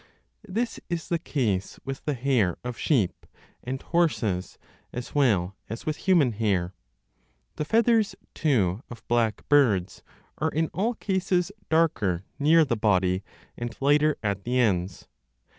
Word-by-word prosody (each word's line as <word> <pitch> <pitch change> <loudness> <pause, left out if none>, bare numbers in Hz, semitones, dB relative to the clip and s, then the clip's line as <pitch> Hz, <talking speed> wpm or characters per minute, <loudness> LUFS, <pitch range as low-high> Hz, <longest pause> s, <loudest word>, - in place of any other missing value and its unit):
This 225 +5 -2
is 170 -2 -3
the 170 - +1
case 110 - -1
with 135 0 -6
the 150 - 0
hair 120 -8 +1
of 125 -1 -4
sheep 110 - 0 0.4
and 130 +2 -3
horses 125 - 0 0.3
as 125 0 -6
well 100 -10 +2
as 115 +3 -6
with 155 - -1
human 170 -10 +3
hair; 100 -5 0 0.8
2 - - -50
the 150 - -1
feathers, 225 +2 +3 0.2
too, 110 - +1
of 120 - -11
black 115 -2 0
birds 115 -12 +3 0.4
are - - +1
in 160 +1 0
all 225 +7 0
cases 190 -2 0 0.2
darker 110 - +1
10 145 - 0
near 165 0 +6
the 125 -4 0
body 95 -3 +2 0.3
and 120 0 -6
lighter 145 +2 +3
at 100 -2 -1
the 125 +1 -1
ends. 95 -6 0
125 Hz, 145 wpm, -26 LUFS, 100-160 Hz, 0.8 s, near